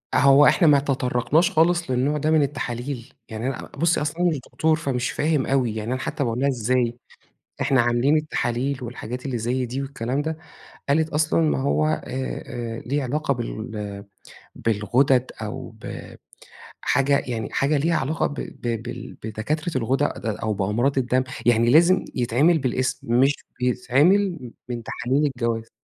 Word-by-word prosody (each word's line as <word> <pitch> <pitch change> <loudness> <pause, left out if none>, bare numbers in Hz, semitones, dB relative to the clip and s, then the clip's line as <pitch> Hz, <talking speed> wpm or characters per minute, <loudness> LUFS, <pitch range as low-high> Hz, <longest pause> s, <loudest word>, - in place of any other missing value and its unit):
هو 140 +2 +6
إحنا 170 - +5
ما 145 -1 +6
تطرقناش 135 +4 +1
خالص 170 -2 +2
للنوع 135 +4 +1
ده 155 +2 0
من 155 - +5
التحاليل، 130 -2 -4 0.2
يعني 110 +2 -4
أنا 135 - -4
بُصّي 170 -1 +2
أصل 150 +3 -3
أنا 175 0 +3
مش 155 -5 -2
دكتور 155 +5 +1
فمش 135 -6 -2
فاهم 150 -3 +1
أوي، 130 -5 +1
يعني 110 +2 -3
أنا 130 - -3
حتّى 135 - -2
باقول 115 -1 -1
لها: 140 - +2
"إزاي؟ 120 -1 0 0.6
إحنا 135 -2 +3
عاملين 120 +5 +3
التحاليل 135 -3 -1
والحاجات 125 +1 -6
اللي 125 -3 -2
زي 125 +3 -1
دي 130 +3 -3
والكلام 135 0 -2
ده،" 160 +1 -3 0.5
قالت 155 +2 +2
أصلًا 155 +2 +1
ما 155 -4 +1
هو 140 +3 +1
آآ، 155 - 0
آآ 120 -3 -5
ليه 140 +2 0
علاقة 140 +2 -1
بال 110 -4 -5 0.5
بالغدد 120 +4 +2
أو 105 -1 -5
ب - - -9 0.7
حاجة 140 +1 +2
يعني 115 -3 -3
حاجة 140 +2 +1
ليها 165 +4 +1
علاقة 155 +5 0
ب - - -5
ب 115 -5 -4
بال 120 - -7
بدكاترة 150 +11 -3
الغدد 130 -1 0
أو 110 0 -1
بأمراض 110 +8 0
الدم، 130 0 +1 0.2
يعني 120 0 +4
لازم 170 +6 +5
يتعمل 135 +7 +3
بالاسم، 130 -2 0
مش 135 +2 +4 0.3
بيتعمل 135 - +2 0.2
من 120 -1 -4
تحاليل 130 +6 -1
الجواز، 115 -4 -2
130 Hz, 160 wpm, -23 LUFS, 120-150 Hz, 0.7 s, هو